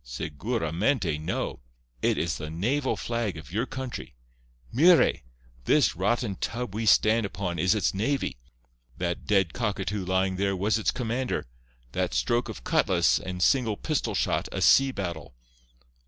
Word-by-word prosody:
Seguramente 85 Hz, -, -1 dB
no. 80 Hz, -, -3 dB, 0.4 s
It -, -, +2 dB
is 85 Hz, 0 st, -1 dB
the 75 Hz, -2 st, -5 dB
naval 125 Hz, -, 0 dB
flag 115 Hz, -7 st, -2 dB
of 80 Hz, 0 st, -11 dB
your 115 Hz, +7 st, -1 dB
country. 130 Hz, -, -6 dB, 0.6 s
Mire! 165 Hz, +7 st, +5 dB, 0.5 s
This -, -, +3 dB
rotten 100 Hz, +2 st, 0 dB
tub 120 Hz, 0 st, -4 dB
we 110 Hz, +1 st, -2 dB
stand 110 Hz, +3 st, +5 dB
upon 95 Hz, -3 st, -3 dB
is 90 Hz, +3 st, +3 dB
its 105 Hz, -, +1 dB
navy—that -, -, -4 dB
dead 95 Hz, -5 st, +2 dB
cockatoo 105 Hz, -3 st, -2 dB
lying 95 Hz, +1 st, 0 dB
there 100 Hz, 0 st, 0 dB
was 105 Hz, +4 st, +1 dB
its 110 Hz, -, +1 dB
commander—that 60 Hz, -, -4 dB
stroke 120 Hz, -, +1 dB
of 60 Hz, -, -8 dB
cutlass -, -, +3 dB
and 90 Hz, -1 st, -3 dB
single 115 Hz, -7 st, +2 dB
pistol 125 Hz, -9 st, -1 dB
shot -, -, 0 dB
a -, -, -3 dB
sea 135 Hz, 0 st, +5 dB
battle. 85 Hz, -, -5 dB
95 Hz, 140 wpm, -27 LUFS, 80-115 Hz, 0.6 s, Mire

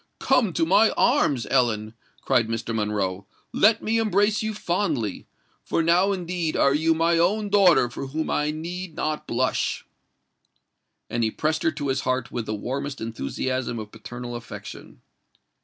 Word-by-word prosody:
"Come 255 Hz, -7 st, +2 dB
to 165 Hz, -, +1 dB
my 195 Hz, +6 st, +5 dB
arms, 150 Hz, -, +2 dB
Ellen!" 110 Hz, -4 st, +1 dB, 0.3 s
cried 125 Hz, -4 st, +2 dB
Mr. 115 Hz, 0 st, -3 dB
Monroe: 100 Hz, -3 st, -2 dB, 0.3 s
"let 220 Hz, +2 st, +4 dB
me 225 Hz, +1 st, +1 dB
embrace 210 Hz, -1 st, +2 dB
you 220 Hz, 0 st, -1 dB
fondly—for 170 Hz, -, -3 dB
now 175 Hz, +4 st, +3 dB
indeed 175 Hz, -3 st, -2 dB
are 140 Hz, -, +4 dB
you 160 Hz, +2 st, +2 dB
my 165 Hz, +1 st, +2 dB
own 205 Hz, +5 st, +1 dB
daughter 195 Hz, -9 st, +5 dB
for 125 Hz, +3 st, -6 dB
whom 155 Hz, +4 st, -3 dB
I 150 Hz, 0 st, +1 dB
need 170 Hz, +2 st, -5 dB
not 155 Hz, 0 st, -3 dB
blush!" -, -, -1 dB, 1.2 s
And 120 Hz, 0 st, -1 dB
he 110 Hz, -, +2 dB
pressed 155 Hz, +6 st, -1 dB
her 165 Hz, -, +2 dB
to 145 Hz, -2 st, -3 dB
his 135 Hz, 0 st, 0 dB
heart 130 Hz, -2 st, -1 dB
with 115 Hz, -2 st, -4 dB
the 110 Hz, -, -2 dB
warmest 135 Hz, +6 st, -4 dB
enthusiasm 115 Hz, -, -3 dB
of 105 Hz, -1 st, -7 dB
paternal 120 Hz, +2 st, -8 dB
affection. 120 Hz, -1 st, -9 dB
150 Hz, 155 wpm, -24 LUFS, 120-180 Hz, 1.2 s, my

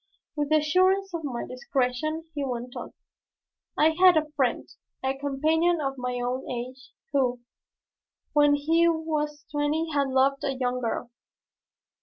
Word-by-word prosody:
With 295 Hz, -1 st, -1 dB
the 310 Hz, -, +4 dB
assurance 370 Hz, +5 st, +2 dB
of 335 Hz, -1 st, -3 dB
my 255 Hz, -5 st, -3 dB
discretion 255 Hz, +5 st, -2 dB
he 290 Hz, -2 st, -2 dB
went 245 Hz, -2 st, -4 dB
on: -, -, -7 dB, 0.8 s
"I 315 Hz, +1 st, +5 dB
had 360 Hz, +1 st, +6 dB
a 305 Hz, -1 st, 0 dB
friend, 260 Hz, -4 st, 0 dB, 0.4 s
a 265 Hz, +1 st, 0 dB
companion 310 Hz, +5 st, +1 dB
of 275 Hz, -2 st, -1 dB
my 250 Hz, 0 st, -2 dB
own 250 Hz, +2 st, -3 dB
age, 255 Hz, +1 st, -6 dB, 0.2 s
who, 255 Hz, -3 st, +1 dB, 0.9 s
when 290 Hz, -1 st, +5 dB
he 325 Hz, +4 st, +3 dB
was 305 Hz, -2 st, -2 dB
twenty, 300 Hz, +2 st, 0 dB
had 280 Hz, -1 st, +2 dB
loved 265 Hz, +1 st, +2 dB
a 275 Hz, -1 st, -1 dB
young 250 Hz, -1 st, -1 dB
girl. 235 Hz, 0 st, -3 dB
290 Hz, 145 wpm, -26 LUFS, 255-315 Hz, 0.9 s, had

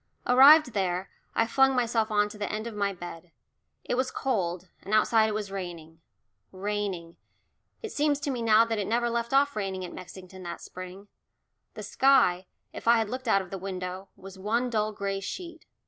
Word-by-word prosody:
Arrived 270 Hz, +1 st, +7 dB
there, 185 Hz, -2 st, -1 dB, 0.2 s
I 225 Hz, -, +3 dB
flung 270 Hz, +3 st, +3 dB
myself 230 Hz, -2 st, +1 dB
on 210 Hz, -1 st, +2 dB
to 210 Hz, -, -11 dB
the 205 Hz, -, -3 dB
end 215 Hz, +1 st, -4 dB
of 235 Hz, -, -6 dB
my 200 Hz, -1 st, 0 dB
bed. 175 Hz, -2 st, -9 dB, 0.5 s
It -, -, -3 dB
was 255 Hz, +1 st, 0 dB
cold, 185 Hz, -10 st, -2 dB
and 205 Hz, +3 st, -1 dB
outside 220 Hz, 0 st, +4 dB
it 210 Hz, -, -3 dB
was 210 Hz, -2 st, -4 dB
raining, 170 Hz, -4 st, -7 dB, 0.5 s
raining 190 Hz, -4 st, -4 dB, 0.7 s
it 445 Hz, -, -5 dB
seems 290 Hz, -1 st, +1 dB
to 280 Hz, -, -1 dB
me 245 Hz, -3 st, -3 dB
now 225 Hz, 0 st, +5 dB
that 225 Hz, -2 st, -2 dB
it 200 Hz, -, -2 dB
never 235 Hz, +1 st, +1 dB
left 235 Hz, 0 st, -2 dB
off 280 Hz, +1 st, +3 dB
raining 190 Hz, -3 st, -3 dB
at 175 Hz, -, -9 dB
Mexington 185 Hz, +1 st, -11 dB
that 175 Hz, -1 st, -6 dB
spring; 185 Hz, +2 st, -10 dB, 0.7 s
the -, -, -7 dB
sky, 190 Hz, -10 st, +3 dB, 0.3 s
if -, -, -9 dB
I 235 Hz, 0 st, +6 dB
had 220 Hz, -1 st, -1 dB
looked 255 Hz, 0 st, -5 dB
out 195 Hz, -3 st, +3 dB
of 180 Hz, -, -15 dB
the 195 Hz, -, -5 dB
window, 185 Hz, 0 st, -6 dB
was 190 Hz, 0 st, -12 dB
one 235 Hz, +5 st, -1 dB
dull 215 Hz, -1 st, 0 dB
gray 200 Hz, -1 st, -3 dB
sheet. 335 Hz, -, -7 dB
210 Hz, 195 wpm, -27 LUFS, 185-235 Hz, 0.7 s, Arrived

